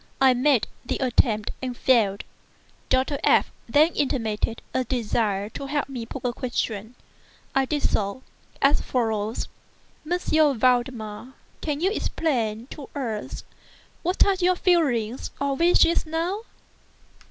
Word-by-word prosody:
I 265 -1 +6
made 255 -1 +3 0.2
the - - -2
attempt 235 -4 +1
and 250 -2 -4
failed. 215 -6 +3 0.7
Dr. 265 +2 +1
F—— - - +4 0.2
then 300 +6 +5
intimated 230 -5 -1
a 260 - +1
desire 215 -5 -1
to 275 +5 -7
have 290 0 -1
me 245 -4 -6
put 265 +1 -7
a 245 - 0
question. 235 -3 -3 0.6
I 270 0 +3
did 295 +2 -2
so, 200 +5 0 0.4
as 280 +2 +4
follows: 220 -3 -1 0.6
"M. 355 - +3 0.4
Valdemar, 245 -1 0 0.3
can 300 -1 -2
you 380 +3 +2
explain 235 - -1
to 285 -3 -9
us 230 -7 -4 0.6
what 360 +3 +3
are 400 - +3
your 365 +1 +4
feelings 265 - +1
or 280 -1 0
wishes 340 +1 +4
now?" 345 +7 -2
255 Hz, 130 wpm, -25 LUFS, 225-290 Hz, 0.7 s, I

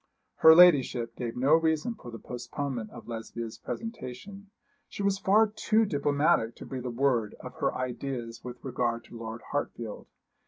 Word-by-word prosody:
Her 160 0 +9
ladyship 130 -9 +5
gave 120 -1 -4
no 135 +5 +3
reason 160 +5 +2
for 125 - -11
the 115 - -7
postponement 125 -1 -5
of 120 - -12
Lesbia's 115 0 -6
presentation. 200 - -7 0.4
She 200 - -5
was 195 -1 +1
far 210 +4 +5
too 220 +1 +1
diplomatic 145 - +1
to - - -10
breathe 130 -2 -6
a - - -1
word 120 -3 +1
of - - -9
her - - 0
ideas 125 -2 -4
with 125 -1 -9
regard 120 -2 -1
to 120 - -12
Lord 115 0 -6
Hartfield. 115 -6 -4
130 Hz, 160 wpm, -29 LUFS, 115-160 Hz, 0.4 s, Her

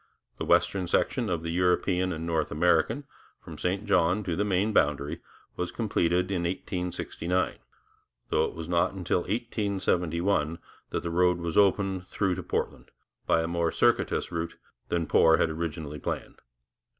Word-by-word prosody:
The - - -2
western 95 -3 +2
section - - +1
of 85 -2 -1
the 85 - -3
European 90 +1 +1
and 80 -1 -4
North 80 -2 0
American, 90 - +2 0.4
from - - -11
St 95 +4 -1
John 90 0 +2
to 90 -4 -2
the 100 - +1
Maine 100 +2 +1
boundary, 75 -4 +1 0.3
was 90 0 -3
completed 90 -4 0
in 90 -3 0
1869, 90 0 -2 0.7
though - - +2
it - - -6
was 80 -1 -6
not 85 0 +2
until 90 -2 0
1871 95 -5 0 0.3
that - - -3
the 85 - -3
road 90 +1 +3
was 85 -2 -4
opened 95 -2 +2
through 95 -2 0
to - - -4
Portland - - -3 0.4
by 80 - +3
a - - -2
more 85 -1 0
circuitous - - +1
route 85 0 -3 0.3
than 85 -1 0
Poor 80 +1 +5
had 80 - +1
originally 80 -2 -4
planned. - - -5
90 Hz, 155 wpm, -28 LUFS, 85-95 Hz, 0.7 s, Poor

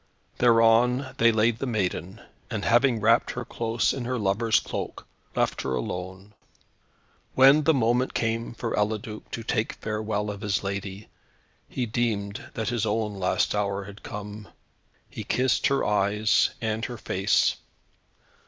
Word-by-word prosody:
Thereon 120 +2 +4
they 115 0 +6
laid 110 +1 +2
the 135 - -2
maiden, 100 -2 -2 0.3
and 110 -3 -3
having 120 0 +3
wrapped 115 +3 +3
her 125 0 -5
close 115 0 0
in 130 -3 -4
her 125 +1 -1
lover's 110 +1 +2
cloak, - - -6 0.3
left - - 0
her 65 - -2
alone. 95 - -5 1.0
When 135 +3 +6
the 160 - +5
moment 125 +1 +1
came 115 +1 -1
for 115 - -3
Eliduc 105 +1 -2
to 115 - -5
take 110 0 -1
farewell 105 -1 -3
of 100 0 -8
his 105 -2 -1
lady, 100 +1 -5 0.6
he 125 - -2
deemed 105 -3 -2
that 110 -1 -2
his 120 -3 -1
own 105 -2 -1
last 90 - +1
hour 100 -1 -1
had 100 +2 -11
come. 105 0 -8 0.6
He - - -7
kissed 130 +2 +1
her 140 -1 +1
eyes 105 +1 +2
and 110 0 -2
her 120 -1 -6
face. 100 -1 +1
110 Hz, 145 wpm, -26 LUFS, 100-120 Hz, 1.0 s, they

